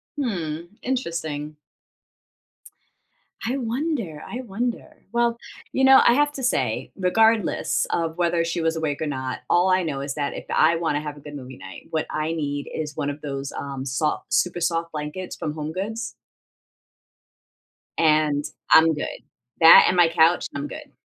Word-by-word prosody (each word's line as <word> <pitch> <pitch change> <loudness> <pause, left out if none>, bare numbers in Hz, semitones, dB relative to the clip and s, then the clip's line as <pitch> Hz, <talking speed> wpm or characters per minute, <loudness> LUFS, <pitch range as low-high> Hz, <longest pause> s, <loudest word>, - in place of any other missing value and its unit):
Hmm, 175 - -3
interesting. 160 - -3 1.9
I 250 +4 -1
wonder 235 - -3
I 245 - -5
wonder. 240 +1 -5
Well, 235 0 +2 0.3
you 265 - 0
know, 265 0 +8
I 235 - +7
have 290 +3 +3
to 270 - -6
say, 130 - 0
regardless 220 +3 +2
of 165 -1 -1
whether 170 -1 +1
she 165 0 -2
was 165 0 +1
awake 155 -3 -2
or 155 - -1
not, 130 -2 -3
all 175 +2 +4
I 185 0 +3
know 145 -4 -3
is 140 0 -4
that 145 -2 -2
if - - -7
I 160 +2 +4
wanna 160 -3 -1
have 150 -1 -6
a - - -13
good 150 0 -9
movie 130 -2 -9
night, 95 - -11
what 160 -1 -1
I 155 +1 -2
need 145 -3 -3
is 150 -2 -5
one 145 - -1
of 145 +1 -6
those, 140 -1 -5
um, 135 -1 -5
soft 140 +4 -2
super 175 -1 +1
soft 165 0 0
blankets 150 +5 -5
from 150 - -4
HomeGoods 190 +10 -4 1.9
and 155 -2 +3 0.3
I'm 160 0 +7
good. 150 - -5 0.4
That 165 - +10
and 180 - +2
my 175 -2 +5
couch, 165 +1 +3
I'm 140 +1 -3
good. - - -10
160 Hz, 160 wpm, -24 LUFS, 150-190 Hz, 1.9 s, That